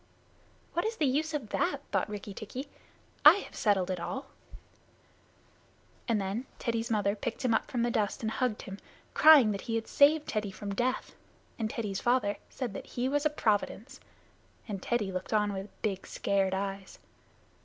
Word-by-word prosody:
"What 345 - 0
is 445 +1 -1
the 310 - +2
use 295 +4 +1
of 255 -8 -4
that?" - - 0
thought - - 0
Rikki 205 -1 -6
tikki. 250 +7 -6 0.6
"I 305 +3 +11
have 405 - -7
settled 190 -4 +2
it 180 - -2
all;" 265 +10 -4 1.8
and 230 -3 +2
then 200 +6 -3
Teddy's 230 0 -2
mother 205 -2 +1
picked 235 +5 -4
him 235 - +3
up 220 - 0
from 245 -5 0
the 240 - +1
dust 210 0 -1
and 220 - 0
hugged 245 -2 -1
him, 195 +1 -8 0.3
crying 295 -8 +8
that 200 -1 -3
he 225 - +1
had 225 -1 -2
saved 300 +2 +4
Teddy 215 -2 -1
from 200 +1 -6
death, 250 +5 -1 0.5
and 220 -1 -1
Teddy's 210 -4 -3
father 240 -5 +2
said 245 -6 -4
that - - -7
he 245 +1 -2
was 290 +2 +2
a - - -2
providence, 235 0 -1 0.7
and 200 -4 -4
Teddy 210 -4 0
looked 185 +3 -4
on 210 -1 +2
with 195 +1 -5
big 195 -3 -2
scared 195 -1 0
eyes. 195 0 -4
220 Hz, 175 wpm, -30 LUFS, 200-255 Hz, 1.8 s, I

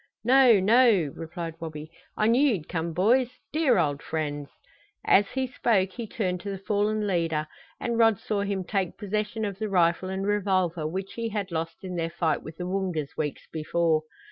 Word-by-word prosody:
"No 250 -3 +6
no!" 205 - +4
replied 165 0 -6
Wabi. 155 -1 -7 0.3
"I 215 - +2
knew 235 +4 +4
you'd 160 -7 -4
come, 170 -1 -2
boys 230 +9 +3 0.2
dear 310 -7 +3
old 145 -4 +1
friends!" 145 -2 -3 0.6
As 200 +1 +5
he 265 0 -1
spoke 215 -6 +1
he 230 +3 -6
turned 190 -7 -2
to 205 - -5
the 195 - -3
fallen 210 +2 0
leader 165 -5 0 0.3
and 235 -1 -1
Rod 225 -3 +5
saw 205 0 -2
him 200 -1 -2
take 190 -2 -2
possession 210 +2 -2
of 200 -1 -5
the 215 -1 -2
rifle 175 0 +2
and 190 +1 -3
revolver 185 -6 +1
which 190 +4 -5
he 230 -1 -3
had 205 -3 -3
lost 165 +1 -4
in 180 -2 -5
their 165 -1 -1
fight 165 -2 0
with 160 0 -10
the 180 - -4
Woongas 180 -6 -2
weeks 150 -3 -3
before. 160 0 +1
190 Hz, 185 wpm, -26 LUFS, 165-215 Hz, 0.6 s, No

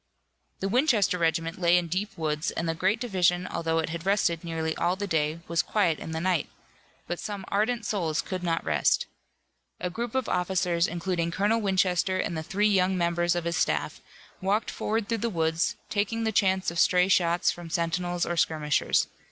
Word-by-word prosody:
The 195 - 0
Winchester 220 - +2
regiment 165 +1 0
lay 175 0 +5
in 175 - +1
deep 185 +6 -3
woods, 150 -1 -1
and 165 - -3
the 165 - +1
great 190 +7 +1
division 180 -6 +1
although 165 -2 -1
it 165 0 0
had 165 0 -5
rested 185 -4 +1
nearly 160 -1 -2
all 175 +2 +1
the 205 +2 -3
day 160 -2 -1
was 170 0 +2
quiet 180 -7 +1
in - - -7
the 160 0 -3
night. 180 -1 0 0.6
But 175 - -4
some 200 -2 -5
ardent 220 +3 0
souls 165 -8 -1
could 185 -1 -4
not 165 -2 -1
rest. 75 -3 +2 0.7
A 180 - -3
group 235 +4 -4
of 260 -2 0
officers, 180 -1 +1
including 170 0 -2
Colonel 205 +6 +1
Winchester 185 -1 +1
and 175 - -2
the 160 - -2
three 200 +6 +1
young 190 -2 +2
members 175 0 +1
of 175 - -1
his 170 0 -1
staff, - - -1 0.4
walked 200 +4 0
forward 220 -1 -2
through 230 -1 -1
the 235 - -1
woods, 160 -3 0 0.2
taking 220 +2 0
the 220 - +1
chance 190 -3 +2
of 170 - -3
stray 180 0 +4
shots 175 -2 +3
from 175 -1 -9
sentinels 175 +1 -1
or 175 - -2
skirmishers. 155 -3 +1
180 Hz, 190 wpm, -27 LUFS, 165-195 Hz, 0.7 s, lay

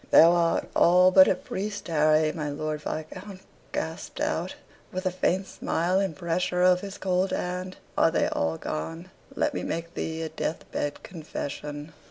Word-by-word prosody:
"Thou 165 +1 +8
art 170 -1 +2
all 180 +2 +6
but 190 0 +8
a - - +3
priest, 205 +3 -5
Harry," 155 -1 +3
my 150 -2 -3
Lord 155 +1 -3
Viscount 185 +6 -6 0.3
gasped - - -4
out, - - -1 0.4
with 185 +1 -4
a 185 - +2
faint 185 +1 0
smile, 180 0 0
and 195 -5 -1
pressure 180 +1 0
of 180 0 +5
his 200 -1 -7
cold 185 0 +1
hand. 180 +1 -3 0.2
"Are - - +4
they - - +1
all 80 0 -1
gone? 165 - -5 0.2
Let - - +1
me - - -2
make 170 +1 -4
thee 160 -1 -3
a 160 - -3
death 160 - -3
bed 145 - -3
confession." 150 -2 -6
170 Hz, 170 wpm, -27 LUFS, 155-185 Hz, 0.4 s, Thou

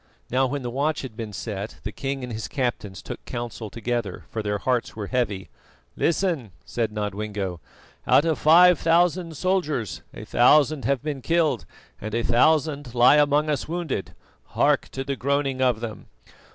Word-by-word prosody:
Now 130 +1 +3
when 140 +1 -3
the 120 - -3
watch 145 +4 -1
had 125 -5 -7
been 110 -2 -6
set 100 +1 -5
the - - -4
king 135 -2 -4
and 125 -2 -5
his 110 0 -4
captains 120 -8 -3
took - - -7
counsel 120 -2 -5
together, 115 -3 -3
for 110 - -2
their 105 -1 -1
hearts 125 +3 -1
were 105 -2 -4
heavy. 105 -5 -2 0.5
"Listen," 165 - 0
said 115 -2 -2
Nodwengo: 105 -3 -3 0.5
"out 145 - +5
of 160 -2 0
five 175 +2 +7
thousand 170 0 +2
soldiers 155 - -1
a - - -9
thousand 140 +1 +4
have 140 +1 0
been 145 -3 -3
killed 160 -5 +1 0.4
and 110 +1 -4
a 115 - 0
thousand 145 +1 +2
lie 125 +4 +6
among 145 +1 +3
us 150 -2 -1
wounded. 165 - -3 0.4
Hark - - +3
to 135 - -3
the 140 +1 -2
groaning 135 0 0
of 125 -4 +2
them! 115 -3 -6
130 Hz, 165 wpm, -24 LUFS, 110-150 Hz, 0.5 s, five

